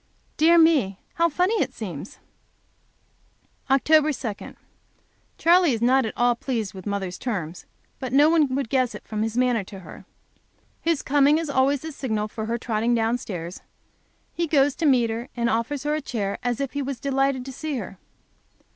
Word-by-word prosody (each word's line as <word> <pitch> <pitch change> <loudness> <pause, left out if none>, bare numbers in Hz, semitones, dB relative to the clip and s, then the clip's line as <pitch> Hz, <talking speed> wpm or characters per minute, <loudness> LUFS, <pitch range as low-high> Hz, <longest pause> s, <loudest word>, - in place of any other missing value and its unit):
Dear 330 +2 +5
me! 295 - +4 0.2
how 335 0 +2
funny 365 +8 +1
it - - -2
seems. 185 -5 -7 1.5
Oct 270 0 +3
2. 295 -8 +1 0.8
Charley 345 -3 +4
is 225 - -3
not 255 0 +3
at - - -7
all 245 0 +3
pleased 230 -4 -3
with 190 0 -9
mother's 195 -3 -3
terms, 180 -9 -4 0.3
but 260 -2 -5
no 285 +3 +6
one 310 -5 +3
would 275 -4 -2
guess 255 -2 +1
it - - -11
from 215 -1 -3
his 225 +1 -2
manner 250 -4 +2
to 195 0 -10
her. - - -12 0.8
His 330 -3 0
coming 290 +2 +4
is 320 -3 -3
always 270 +1 +2
the 320 - -6
signal 220 -7 -2
for 220 0 -5
her 235 +1 -1
trotting 230 +1 0
down 230 +2 +1
stairs; 175 -5 -7 0.7
he 340 0 -1
goes 285 -2 +3
to 325 - +1
meet 245 -5 +3
her 235 +3 -5
and 235 0 +1
offers 240 +5 -1
her 295 +1 0
a 310 - -1
chair, 205 -7 -3
as 245 -2 -1
if 275 -2 -3
he 285 - -2
was 270 -2 -4
delighted 270 -2 0
to 265 - -6
see 300 +1 -4
her. 195 -4 -7
255 Hz, 180 wpm, -24 LUFS, 225-290 Hz, 1.5 s, no